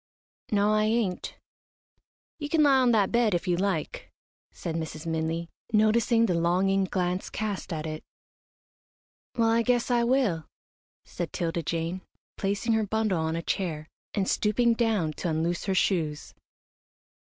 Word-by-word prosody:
"No, 210 0 +3
I 215 0 +3
ain't." 215 -4 -1 1.0
"You 290 -1 -4
can 315 -1 +3
lie 275 -2 +5
on 255 -1 +4
that 205 -4 +3
bed 235 -5 +3
if 175 - -2
you 175 - +2
like," 185 -3 -2 0.4
said 170 - -6
Mrs. 160 -1 -5
Minley, 165 +1 -2 0.2
noticing 225 +2 +4
the 185 - +1
longing 185 +3 +2
glance 180 -1 -2
cast 205 -3 -4
at 155 -2 -3
it. 155 0 -5 1.3
"Well, 230 -1 +3
I 230 +1 +3
guess 245 +1 +1
I 240 -1 +3
will," 235 - +1 0.6
said - - -5
'Tilda 170 0 -2
Jane, 165 +3 -3 0.3
placing 205 +4 0
her 220 0 +2
bundle 215 -4 0
on 160 0 -1
a 165 - -3
chair, 155 -5 -3 0.3
and 195 -2 0
stooping 230 +3 +2
down 220 -9 0
to 175 - -2
unloose 165 +2 -1
her 195 - 0
shoes. 160 -6 0
195 Hz, 150 wpm, -27 LUFS, 165-225 Hz, 1.3 s, lie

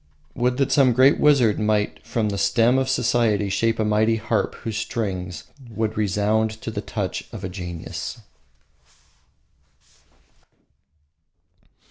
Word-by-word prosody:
Would 125 +1 0
that 135 - +1
some 135 -4 +4
great 130 +4 +5
wizard 135 -8 +4
might 105 -1 0
from 115 -2 -1
the 100 - -3
stem 115 +6 +3
of 135 0 -1
society 115 -5 +1
shape 115 +4 0
a 110 - 0
mighty 110 +2 +2
harp 110 0 -1
whose 110 -2 -6
strings 95 -6 -4 0.3
would 110 0 -2
resound 105 +2 +1
to 115 - -4
the 105 -2 -4
touch 100 -3 -4
of 105 -5 -7
genius. 90 -3 -6
110 Hz, 120 wpm, -23 LUFS, 105-120 Hz, 0.3 s, great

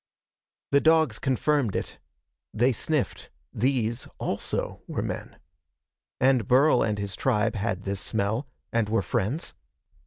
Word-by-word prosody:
The 140 0 +5
dogs 160 -8 +4
confirmed 135 -3 +1
it. - - -4 0.6
They 120 +4 +4
sniffed. 145 +4 -2 0.2
These, 120 -1 0
also, - - -3
were - - -2
men. - - -5 0.8
And 130 -4 +3
Burl 130 +1 +5
and 105 -1 +1
his 100 -2 -4
tribe 115 -2 +1
had 100 -3 -2
this 100 -1 -3
smell, 110 +6 -1 0.3
and 115 -3 +1
were 110 -2 +1
friends. 105 - -1
115 Hz, 125 wpm, -27 LUFS, 105-135 Hz, 0.8 s, The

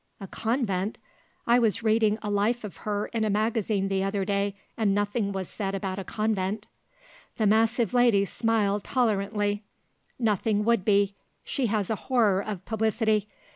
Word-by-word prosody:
"A 195 - -7
convent? 220 -2 -1 0.5
I 240 +1 +5
was 225 -2 +1
reading 220 -1 +3
a 210 - -2
life 215 +4 +1
of 190 -6 -7
her 205 +3 -2
in 225 -1 0
a 215 - +1
magazine 210 -1 0
the 195 0 0
other 195 0 -1
day 200 0 0 0.2
and 210 -3 +1
nothing 205 0 0
was 190 -2 -4
said 195 -2 -3
about 195 -1 -3
a - - -4
convent." 210 0 -2 0.7
The 220 - +1
massive 225 +1 +2
lady 240 -5 +4
smiled 210 -2 0
tolerantly: 205 -3 0 0.5
"Nothing 210 -2 +1
would 235 -4 +3
be. 200 -1 +3 0.3
She 265 -4 -1
has 210 -2 -1
a - - +1
horror 215 -7 +3
of 200 -3 -6
publicity. 220 -1 +1
210 Hz, 160 wpm, -27 LUFS, 200-225 Hz, 0.7 s, I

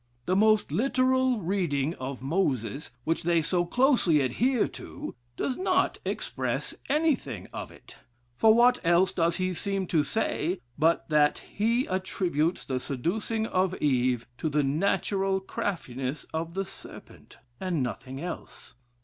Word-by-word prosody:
The 185 - +1
most 215 +1 +4
literal 255 -1 +2
reading 165 -5 0
of 130 -2 -6
Moses, 140 - -1
which 165 +4 0
they 170 0 +2
so 175 +3 +1
closely 240 - +3
adhere 230 - +2
to, - - -8 0.2
does 255 - -1
not 375 0 +1
express - - -2 0.2
anything 305 -2 0
of - - -5
it; - - -15 0.4
for 220 - +5
what 240 +3 +5
else 175 +2 +4
does 170 -1 +1
he 185 -1 -1
seem 195 +2 -1
to 165 -3 +2
say, 175 +2 -1 0.2
but 160 +4 +2
that 150 -1 +4 0.2
he 230 +5 +2
attributes 185 -3 -1
the 130 -1 -1
seducing 205 - -2
of 185 -3 +1
Eve 125 -5 +1
to 160 - 0
the 150 0 +2
natural 190 +6 +1
craftiness 145 -8 -4
of 165 +2 -3
the 195 0 -1
serpent, - - -12 0.2
and 175 -7 -1
nothing 125 +3 -5
else? 175 -5 -7
180 Hz, 140 wpm, -28 LUFS, 150-215 Hz, 0.4 s, for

